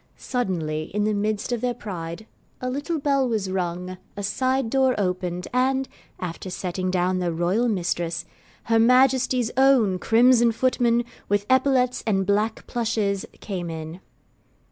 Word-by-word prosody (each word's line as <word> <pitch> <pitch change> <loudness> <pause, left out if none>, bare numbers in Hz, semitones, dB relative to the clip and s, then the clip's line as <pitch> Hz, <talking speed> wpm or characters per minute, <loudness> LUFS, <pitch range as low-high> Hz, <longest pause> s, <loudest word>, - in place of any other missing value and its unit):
Suddenly, 165 - -2
in 210 - +1
the 215 0 +1
midst 210 +2 -1
of 240 -2 -1
their 245 -1 -1
pride, 175 -2 -6 0.3
a 255 0 -3
little 290 +5 -2
bell 275 -3 +1
was 205 -5 -1
rung, 180 0 -3 0.2
a 205 - -4
side 255 +3 0
door 265 -1 +3
opened, 180 -2 -2
and 265 +1 +1 0.3
(after 180 +1 -5
setting 185 0 -3
down 185 0 +1
their 175 -1 0
Royal 175 +8 +1
Mistress) 170 -4 -1 0.4
her 225 0 +2
Majesty's 250 0 +3
own 255 -9 +4
crimson 235 +2 +5
footmen, 240 -1 +2 0.2
with 205 0 +1
epaulets 260 -1 +2
and 195 -3 +2
black 210 +3 0
plushes, 220 -4 -1
came 180 -4 -4
in. 160 +1 -6
215 Hz, 145 wpm, -24 LUFS, 180-250 Hz, 0.4 s, crimson